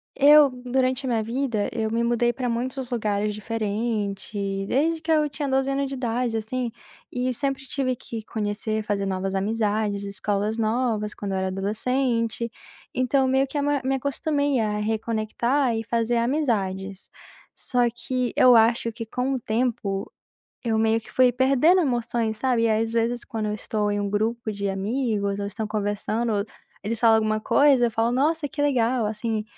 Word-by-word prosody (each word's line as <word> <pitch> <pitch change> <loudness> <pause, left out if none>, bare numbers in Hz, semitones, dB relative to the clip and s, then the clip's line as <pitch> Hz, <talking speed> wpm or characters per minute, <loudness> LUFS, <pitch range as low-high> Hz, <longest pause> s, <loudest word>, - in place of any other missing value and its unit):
eu 290 0 +7
durante 260 +1 0
minha 230 -3 +1
vida, 230 -2 -1
eu 220 -1 -1
me 230 +1 0
mudei 240 0 +2
pra 250 +1 -3
muitos 255 +2 -3
lugares 210 -3 0
diferente, 205 -2 -3
desde 315 +7 +1
que 325 0 -2
eu 305 -1 +3
tinha 290 0 -4
12 265 +1 +1
anos 275 0 0
de 270 - -5
idade, 240 -2 -1
assim, 235 +2 -3 0.4
e 250 +1 -1
eu - - -1
sempre 270 +1 -2
tive 255 -2 -1
que 230 -2 -7
conhecer, 215 0 -2
fazer 200 -1 -1
novas 190 0 -2
amizades, 205 0 0
escolas 205 +1 -2
novas 220 -1 0
quando 200 -1 -5
eu 190 - -1
era 190 - -1
adolescente, 230 +4 -1 0.5
então 260 +1 +2
meio 265 +1 +2
que 295 - -5
a 285 - +1
ma 290 -1 +1
me 265 +1 +1
acostumei 285 0 0
a 210 -1 0
reconectar 225 +4 0
e 225 - -2
fazer 230 +1 0
amizades. 200 -8 -1 0.5
Só 250 - -2
que 250 -1 -2
eu 250 -1 +7
acho 230 +1 +4
que 230 +1 -6
com 250 +4 -2
o 260 - -1
tempo, 220 -4 -2 0.5
eu 225 -3 0
meio 220 0 +2
que 225 - -14
fui 255 -1 +4
perdendo 270 +8 +4
emoções, 240 -6 0
sabe, 240 0 +1
e 230 - +3
às 225 +1 +1
vezes, 235 +1 0
quando 220 -2 -4
eu 210 - -1
estou 210 0 -2
em 205 - -1
um 200 - -2
grupo 220 +2 -1
de 200 -1 -2
amigos 200 0 -1
ou 200 - -2
estão 210 +2 -4
conversando, 210 +1 -1 0.4
eles 220 +2 -2
falam 225 -1 +6
alguma 215 0 0
coisa, 275 0 +4
eu - - -4
falo: 225 +2 +1
"Nossa, 300 +4 +1
que 290 - -4
legal", 250 -4 +2
assim, 215 +1 -2
230 Hz, 175 wpm, -24 LUFS, 215-255 Hz, 0.5 s, eu